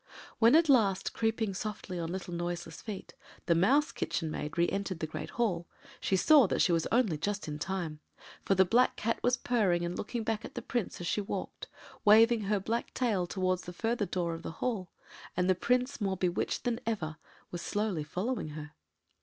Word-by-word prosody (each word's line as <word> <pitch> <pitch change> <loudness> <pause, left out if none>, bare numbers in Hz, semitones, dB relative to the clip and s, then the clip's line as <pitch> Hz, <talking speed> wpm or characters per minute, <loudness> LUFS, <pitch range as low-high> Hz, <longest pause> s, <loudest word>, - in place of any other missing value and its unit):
When 230 +4 +6
at 330 0 +5
last, 215 -9 +3
creeping 225 -2 0
softly 200 -2 -5
on 165 0 -3
little 185 -1 -5
noiseless 175 -1 -4
feet, 210 -4 -7 0.3
the 170 - +4
Mouse 265 - +3
Kitchen 160 -2 -2
Maid 150 +1 -5
re 170 0 +4
entered 195 -2 -2
the 160 - -1
great 155 0 -6
hall, 180 -8 -1 0.3
she 195 - +1
saw 280 - +6
that - - -1
she - - +4
was 165 -1 +1
only 220 -10 +2
just 205 +3 -2
in 150 -1 -4
time, 170 -4 -3 0.4
for 195 - +2
the 190 0 +5
black 240 +7 +3
Cat 230 +1 -1
was 245 +1 +2
purring 190 -8 +1
and 175 +1 -3
looking 230 +2 -3
back 220 0 -1
at - - -9
the - - -3
Prince 235 -6 -3
as - - -4
she 210 - 0
walked, 200 - -5 0.4
waving 225 +2 +6
her 205 0 +1
black 225 +5 -3
tail 210 -8 +1
towards 185 0 0
the 180 - -8
further 225 +2 -1
door 170 -2 -1
of 165 - -6
the 165 - -6
hall, 205 -7 -2 0.5
and 180 0 +2
the 185 - +5
Prince, 250 +7 0
more 195 -2 0
bewitched 180 0 -1
than 240 -2 0
ever, 160 -9 -2 0.3
was 175 - -4
slowly 205 -6 -1
following 185 +7 -2
her. 150 0 -8
195 Hz, 200 wpm, -31 LUFS, 175-230 Hz, 0.5 s, When